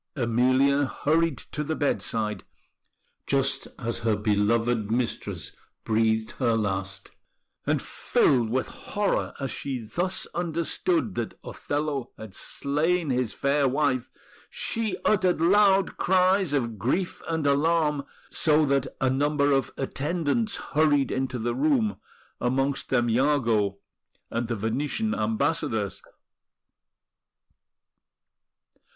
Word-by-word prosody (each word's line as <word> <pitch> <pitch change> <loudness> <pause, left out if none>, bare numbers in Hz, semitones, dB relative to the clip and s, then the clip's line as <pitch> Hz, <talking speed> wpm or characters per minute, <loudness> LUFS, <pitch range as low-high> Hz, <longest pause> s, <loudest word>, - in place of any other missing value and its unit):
Emilia 130 +3 +3
hurried 160 +2 +1
to 150 - -5
the 160 +2 -2
bedside, 110 -7 -1 0.8
just 135 -1 0
as 115 -2 -3
her 115 -2 +1
beloved 105 +2 +1
mistress 120 +1 -2 0.3
breathed 110 0 +1
her 120 -3 +2
last; 95 -3 -3 0.6
and - - +1
filled 120 -5 +2
with 130 +3 0
horror 205 -1 -2
as 135 -1 -3
she 135 -2 -3
thus 170 - -2
understood 175 - -1
that 115 -2 -4
Othello 145 -3 -3
had 110 -3 -10
slain 150 - 0
his 125 -3 0
fair 140 0 +2
wife, 130 -2 0 0.4
she 225 -2 -2
uttered 185 -5 +3
loud 195 +2 +4
cries 185 -1 +3
of 115 -7 -1
grief 170 - -1
and 160 -2 -1
alarm, 150 0 +2 0.3
so 155 -1 +3
that 140 -1 +1
a 135 - +2
number 145 +2 +2
of 135 -1 +1
attendants 140 -3 -1 0.2
hurried 145 -3 +3
into 130 -1 -2
the 120 +1 -1
room, 270 -8 +1 0.4
amongst 135 +3 0
them 120 -2 +2
Iago 115 -6 +2 0.5
and 115 0 -1
the 120 - -2
Venetian 140 - -1
Ambassadors. 110 - -1
135 Hz, 110 wpm, -26 LUFS, 115-160 Hz, 0.8 s, loud